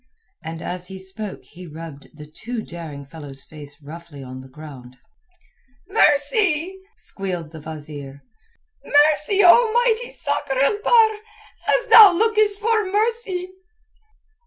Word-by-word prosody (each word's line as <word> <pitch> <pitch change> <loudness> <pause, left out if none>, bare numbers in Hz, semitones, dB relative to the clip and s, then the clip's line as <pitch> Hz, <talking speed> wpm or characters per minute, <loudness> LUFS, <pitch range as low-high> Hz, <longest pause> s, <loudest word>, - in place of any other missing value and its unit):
And 165 0 -7
as 180 0 -5
he 190 - -9
spoke 190 +2 -8
he 180 +1 -13
rubbed 155 -2 -11
the 150 - -10
too 220 +9 -7
daring 155 -5 -9
fellow's 140 -2 -11
face 145 -2 -13
roughly 155 -1 -11
on 130 0 -9
the 130 - -13
ground. 130 -3 -13 0.9
"Mercy!" 345 0 +1 0.2
squealed 180 -5 -6
the 160 - -10
wazeer. 145 -3 -9 0.6
"Mercy, 300 +7 +3
O 450 +6 +6
mighty 480 0 +1
Sakr 270 - -3
el 280 +11 +1
Bahr, 445 -2 +4 0.6
as - - -7
thou 435 -4 +10
lookest 425 +1 +2
for 440 0 +1
mercy!" 415 -4 -2
195 Hz, 125 wpm, -21 LUFS, -, 0.9 s, thou